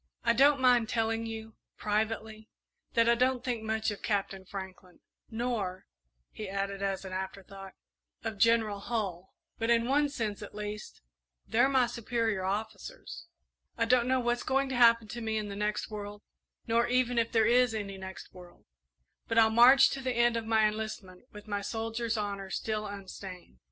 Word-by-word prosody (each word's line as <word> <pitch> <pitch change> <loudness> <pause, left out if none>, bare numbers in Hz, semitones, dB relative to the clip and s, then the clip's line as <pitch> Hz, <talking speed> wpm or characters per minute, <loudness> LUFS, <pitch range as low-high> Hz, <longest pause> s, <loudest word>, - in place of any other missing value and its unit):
"I 235 - +3
don't 280 +3 +5
mind 245 -3 +4
telling 225 0 0
you, 220 0 -7 0.2
privately, 220 +1 -2 0.5
that 230 0 +4
I 235 - +6
don't 250 +1 +1
think 240 -3 -2
much 220 0 -1
of 205 - -7
Captain 195 -2 -2
Franklin, 190 -1 -9 0.3
nor," 220 -5 -3 0.5
he 215 -3 -7
added, 195 0 -3
as 195 -1 -2
an 185 - -7
afterthought, 190 0 -7 0.5
"of 220 -3 -4
General 225 -2 +3
Hull; 195 -5 -4 0.2
but, 225 0 -1
in 235 0 +3
one 290 +2 +2
sense 220 -7 -3
at 205 - -9
least, 210 0 -6 0.5
they're 245 +4 +3
my 260 -2 +4
superior 230 -4 -2
officers. 220 - -5 0.5
I 230 - +2
don't 245 +1 +3
know 260 0 +2
what's 240 0 0
going 270 +1 0
to 260 - -2
happen 230 -2 +5
to 240 +1 -6
me 220 -1 -1
in 210 -1 -3
the 200 - -6
next 210 +1 -2
world, 205 0 -7 0.4
nor 230 +1 +2
even 245 -1 +2
if 230 - 0
there 225 -2 +3
is 245 0 +4
any 200 -2 -5
next 190 -1 -9
world; 180 -1 -15 0.6
but 230 - -1
I'll 220 -1 +6
march 250 +4 +7
to 270 - -4
the 255 -1 -1
end 240 0 +3
of 225 -1 -3
my 220 -1 +4
enlistment 210 -2 -6
with 210 +1 -12
my 205 -1 -2
soldier's 225 +2 -2
honour 200 -2 -3
still 215 +1 -2
unstained." 190 - -9
220 Hz, 175 wpm, -30 LUFS, 200-235 Hz, 0.6 s, march